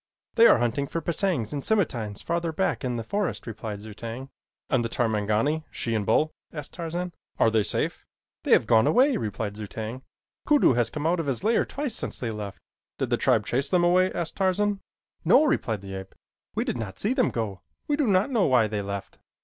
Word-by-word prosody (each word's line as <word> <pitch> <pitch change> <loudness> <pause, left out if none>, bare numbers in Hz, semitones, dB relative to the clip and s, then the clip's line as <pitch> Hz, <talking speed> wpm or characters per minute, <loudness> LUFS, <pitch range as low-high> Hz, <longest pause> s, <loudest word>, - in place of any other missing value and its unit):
"They 230 0 +7
are - - +6
hunting 120 +4 0
for 165 - -3
pisangs 165 - 0
and 145 - -2
scimatines 125 - 0
farther 170 -1 -1
back 190 0 -1
in 125 -1 -1
the 115 - -3
forest," 200 - -2
replied 110 -2 -6
Zu 110 0 -9
tag. 115 +5 -7 0.4
"And 130 -4 +1
the 115 - -2
Tarmangani 110 +7 0
she 115 - -3
and 105 -3 -1
bull 155 +1 +3
" - - -54
asked 150 -3 -7
Tarzan, 175 +1 -4 0.2
"are 115 - +4
they 110 -1 +3
safe?" - - -2 0.4
"They - - -5
have - - +5
gone 110 -1 +4
away," 265 +3 +4
replied 105 -1 -4
Zu 105 -1 -5
tag. 110 +5 -6 0.5
"Kudu 295 - +5
has 120 -1 +1
come 150 +3 -5
out 170 +2 +2
of 160 - -2
his 135 +1 0
lair 225 +2 +3
twice 280 -4 -3
since - - -2
they 120 -3 -3
left." 105 -2 -6 0.4
"Did - - -2
the - - +3
tribe - - +2
chase 135 +4 0
them 180 -2 +3
away?" 185 +2 +4
asked 170 -2 -4
Tarzan. 200 +1 +1 0.4
"No," - - +6
replied 110 - 0
the 95 0 -8
ape. 95 0 -8 0.4
"We - - +1
did 125 - -3
not 105 -4 -5
see 215 +5 +1
them 260 -2 +2
go. 105 -6 -4 0.3
We 295 - +2
do 290 -3 +1
not 200 +5 +3
know 225 -6 +3
why 125 -4 +4
they 105 -1 -2
left." 100 0 -6
130 Hz, 215 wpm, -26 LUFS, 110-180 Hz, 0.5 s, They